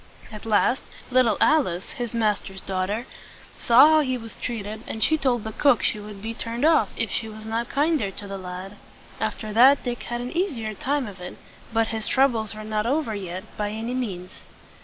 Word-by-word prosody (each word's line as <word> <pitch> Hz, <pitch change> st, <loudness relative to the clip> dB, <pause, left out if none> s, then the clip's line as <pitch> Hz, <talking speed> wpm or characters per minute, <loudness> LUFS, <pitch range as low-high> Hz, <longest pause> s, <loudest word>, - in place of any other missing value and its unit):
At 215 Hz, +1 st, -9 dB
last, 225 Hz, +4 st, +3 dB, 0.3 s
little 245 Hz, -5 st, +4 dB
Alice, 225 Hz, -, +2 dB
his 240 Hz, -2 st, -4 dB
master's 210 Hz, -4 st, -1 dB
daughter, 195 Hz, +5 st, -2 dB, 0.5 s
saw 245 Hz, +3 st, +7 dB
how 315 Hz, 0 st, +6 dB
he 255 Hz, -4 st, 0 dB
was 225 Hz, -2 st, -9 dB
treated, 220 Hz, -2 st, -5 dB
and 220 Hz, -, -2 dB
she 315 Hz, -, +4 dB
told 255 Hz, -6 st, +1 dB
the 220 Hz, -, -4 dB
cook 280 Hz, +1 st, +3 dB
she 215 Hz, -, +1 dB
would 205 Hz, -1 st, -10 dB
be 225 Hz, +1 st, -3 dB
turned 235 Hz, +3 st, -2 dB
off 315 Hz, -11 st, +4 dB
if 225 Hz, -3 st, -1 dB
she 225 Hz, -, -2 dB
was 215 Hz, 0 st, -10 dB
not 225 Hz, +1 st, -2 dB
kinder 290 Hz, -7 st, +1 dB
to 200 Hz, +1 st, -9 dB
the 195 Hz, 0 st, -5 dB
lad. 185 Hz, +2 st, -7 dB, 0.4 s
After 215 Hz, -1 st, -3 dB
that, 260 Hz, +5 st, +6 dB
Dick 240 Hz, -1 st, -3 dB
had 240 Hz, 0 st, -4 dB
an 245 Hz, +6 st, -5 dB
eas 355 Hz, -6 st, 0 dB
i 225 Hz, -, -5 dB
er 215 Hz, 0 st, -3 dB
time 275 Hz, +6 st, -1 dB
of 195 Hz, -4 st, -9 dB
it; 180 Hz, -, -8 dB, 0.3 s
but 225 Hz, 0 st, +1 dB
his 220 Hz, -1 st, -3 dB
troubles 235 Hz, -6 st, +2 dB
were 215 Hz, -, -7 dB
not 215 Hz, 0 st, -1 dB
over 275 Hz, -3 st, 0 dB
yet, 185 Hz, -2 st, -5 dB
by 210 Hz, -1 st, -1 dB
any 225 Hz, +3 st, -4 dB
means. 190 Hz, -8 st, -4 dB
225 Hz, 205 wpm, -24 LUFS, 210-250 Hz, 0.5 s, saw